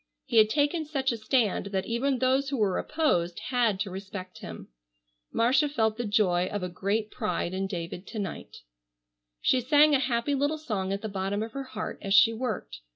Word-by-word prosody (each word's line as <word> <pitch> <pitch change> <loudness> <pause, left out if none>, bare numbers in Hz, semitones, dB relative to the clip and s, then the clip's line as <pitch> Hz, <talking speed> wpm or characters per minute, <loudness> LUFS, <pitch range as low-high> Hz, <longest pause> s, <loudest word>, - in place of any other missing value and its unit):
He - - -1
had 215 -1 +7
taken 295 +6 +1
such 280 -3 -1
a 235 - -3
stand 220 -3 +1
that 195 -1 -2
even 255 +4 0
those 265 +2 +2
who 275 - -2
were 205 -5 +1
opposed 175 - 0
had 235 -6 +2
to 200 - -2
respect 190 -1 -7
him. 85 -1 -9 0.6
Marcia 260 +6 +3
felt 220 -5 0
the 240 - -2
joy 185 -4 +2
of 205 -1 -4
a 180 - -2
great 205 +5 -2
pride 215 -6 -2
in 190 +1 -1
David 175 0 -6
to - - -7
night. 200 - -6 0.8
She 255 - +3
sang 295 +4 +5
a 275 - +4
happy 255 +1 0
little 285 +3 +1
song 205 -11 -3
at 200 +2 -3
the - - -2
bottom 200 +1 -2
of 225 - -6
her 275 0 -5
heart 215 -4 -6
as 195 0 +1
she 225 +3 +7
worked. 220 - -4
220 Hz, 200 wpm, -28 LUFS, 195-265 Hz, 0.8 s, had